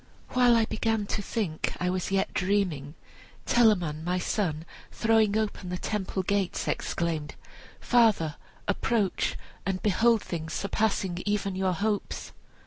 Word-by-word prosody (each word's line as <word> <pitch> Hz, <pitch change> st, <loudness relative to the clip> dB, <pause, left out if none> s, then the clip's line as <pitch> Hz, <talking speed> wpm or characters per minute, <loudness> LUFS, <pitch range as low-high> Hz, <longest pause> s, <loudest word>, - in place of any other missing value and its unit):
While 245 Hz, -1 st, +5 dB
I 225 Hz, -1 st, +4 dB
began 220 Hz, -1 st, 0 dB
to 205 Hz, -, -2 dB
think 195 Hz, -6 st, -2 dB
I 180 Hz, 0 st, +1 dB
was 185 Hz, -1 st, -2 dB
yet 195 Hz, 0 st, 0 dB
dreaming, 180 Hz, -7 st, 0 dB, 0.5 s
Telamon, 180 Hz, -10 st, +3 dB
my 180 Hz, +2 st, 0 dB
son, 170 Hz, -4 st, -1 dB, 0.3 s
throwing 220 Hz, -2 st, +3 dB
open 205 Hz, -4 st, -2 dB
the 180 Hz, -, -2 dB
temple 190 Hz, -1 st, -2 dB
gates, 200 Hz, -1 st, 0 dB
exclaimed: 160 Hz, -3 st, -2 dB, 0.4 s
'Father, 215 Hz, -11 st, +3 dB, 0.3 s
approach, 205 Hz, 0 st, 0 dB, 0.3 s
and 190 Hz, -1 st, -1 dB
behold 225 Hz, +2 st, +3 dB
things 160 Hz, -2 st, -5 dB
surpassing 195 Hz, -3 st, 0 dB
even 200 Hz, -2 st, 0 dB
your 190 Hz, -1 st, +1 dB
hopes!' 205 Hz, +3 st, -2 dB
195 Hz, 130 wpm, -28 LUFS, 175-220 Hz, 0.5 s, While